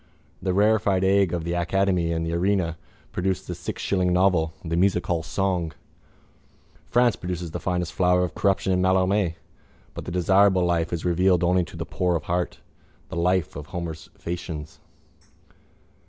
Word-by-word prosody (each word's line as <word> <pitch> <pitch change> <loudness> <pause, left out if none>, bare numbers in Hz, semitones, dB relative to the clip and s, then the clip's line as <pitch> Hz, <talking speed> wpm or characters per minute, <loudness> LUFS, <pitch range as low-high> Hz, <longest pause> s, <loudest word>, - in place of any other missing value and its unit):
The 95 -1 -1
rarefied 100 -2 +3
air 100 0 +4
of 85 -2 -2
the 85 +1 -2
academy 90 0 +1
and 80 0 -1
the 80 - -2
arena 90 -1 +1 0.4
produce 95 +1 -1
the 90 - -5
sixshilling 90 +2 -1
novel, 90 -3 +3
the 85 0 -1
musichall 90 -2 +1
song. 90 -1 -1 1.2
France 120 -1 +3
produces 90 -2 -5
the - - -4
finest 90 -2 -2
flower 90 0 +3
of 90 - -3
corruption 95 -1 +1
in 90 - +2
Mallarmé 95 -1 +2 0.6
but - - -7
the - - -5
desirable 95 +1 +4
life 85 -1 0
is 85 -1 -3
revealed 90 0 +3
only 90 +1 +3
to - - -11
the - - -4
poor 90 -1 0
of 85 - -2
heart, 90 0 -2 0.5
the - - -6
life 90 0 +1
of 75 0 -7
Homer's 80 -2 -6
Phæacians. 80 -3 -6
90 Hz, 155 wpm, -25 LUFS, 85-95 Hz, 1.2 s, air